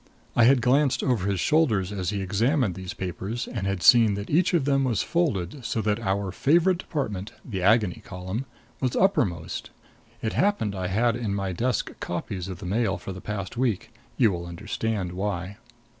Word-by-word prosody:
I 120 Hz, -, +6 dB
had 125 Hz, -1 st, +5 dB
glanced 130 Hz, 0 st, +3 dB
over 115 Hz, -8 st, +1 dB
his 100 Hz, -2 st, 0 dB
shoulder 150 Hz, -, +3 dB
as 95 Hz, -1 st, -3 dB
he 100 Hz, -1 st, -2 dB
examined 110 Hz, -, +1 dB
these 95 Hz, 0 st, -7 dB
papers, 95 Hz, +5 st, -4 dB
and 100 Hz, -5 st, -3 dB
had 100 Hz, -3 st, -2 dB
seen 115 Hz, -4 st, +7 dB
that 100 Hz, +2 st, -6 dB
each 175 Hz, +5 st, +3 dB
of 155 Hz, -6 st, +2 dB
them 135 Hz, -1 st, +2 dB
was 125 Hz, -5 st, +1 dB
folded 140 Hz, -, -1 dB
so 115 Hz, -, -2 dB
that 105 Hz, +1 st, +1 dB
our 100 Hz, -2 st, -1 dB
favorite 170 Hz, -, +3 dB
department 105 Hz, -, -4 dB
the 95 Hz, -7 st, -4 dB
Agony 105 Hz, -1 st, +3 dB
Column 95 Hz, +7 st, -5 dB, 0.3 s
was 130 Hz, -2 st, -1 dB
uppermost. 175 Hz, -, +1 dB, 0.5 s
It 110 Hz, -, -1 dB
happened 200 Hz, -, +1 dB
I 95 Hz, -2 st, -3 dB
had 115 Hz, +5 st, +2 dB
in 105 Hz, -5 st, -2 dB
my 100 Hz, -1 st, -2 dB
desk 120 Hz, +6 st, -1 dB
copies 90 Hz, +1 st, -4 dB
of 95 Hz, -2 st, -6 dB
the -, -, -9 dB
Mail 100 Hz, +1 st, 0 dB
for 95 Hz, -, -7 dB
the 90 Hz, -, -9 dB
past 100 Hz, +1 st, -5 dB
week. 115 Hz, -3 st, -1 dB, 0.2 s
You 115 Hz, -5 st, +4 dB
will 85 Hz, -1 st, -4 dB
understand 105 Hz, +1 st, -3 dB
why. 95 Hz, 0 st, -3 dB
105 Hz, 185 wpm, -26 LUFS, 95-125 Hz, 0.5 s, seen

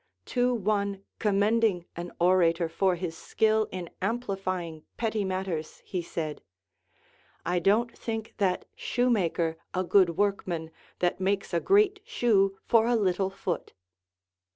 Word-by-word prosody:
To 250 Hz, 0 st, +3 dB
one 200 Hz, -2 st, -1 dB, 0.2 s
commending 205 Hz, -2 st, +2 dB
an 175 Hz, +1 st, -6 dB
orator 170 Hz, -1 st, +3 dB
for 185 Hz, +2 st, +1 dB
his 170 Hz, -2 st, -4 dB
skill 220 Hz, +4 st, +1 dB
in 180 Hz, -2 st, -6 dB
amplifying 185 Hz, -8 st, -2 dB
petty 220 Hz, -2 st, 0 dB
matters 185 Hz, -4 st, -3 dB
he 180 Hz, -, -2 dB
said, 160 Hz, -3 st, -4 dB, 1.0 s
I 180 Hz, +1 st, +1 dB
don't 215 Hz, +6 st, +2 dB
think 225 Hz, -1 st, -5 dB
that 185 Hz, -3 st, +1 dB
shoemaker 180 Hz, -10 st, 0 dB, 0.2 s
a 185 Hz, -, +1 dB
good 180 Hz, -2 st, +4 dB
workman 185 Hz, -5 st, -1 dB, 0.3 s
that 175 Hz, +1 st, +1 dB
makes 195 Hz, 0 st, -1 dB
a 170 Hz, -, +3 dB
great 405 Hz, -, +3 dB
shoe 195 Hz, -, +2 dB
for 230 Hz, -1 st, +4 dB
a 240 Hz, -, +3 dB
little 190 Hz, -3 st, +1 dB
foot. 190 Hz, -2 st, -4 dB
195 Hz, 130 wpm, -28 LUFS, 175-220 Hz, 1.0 s, good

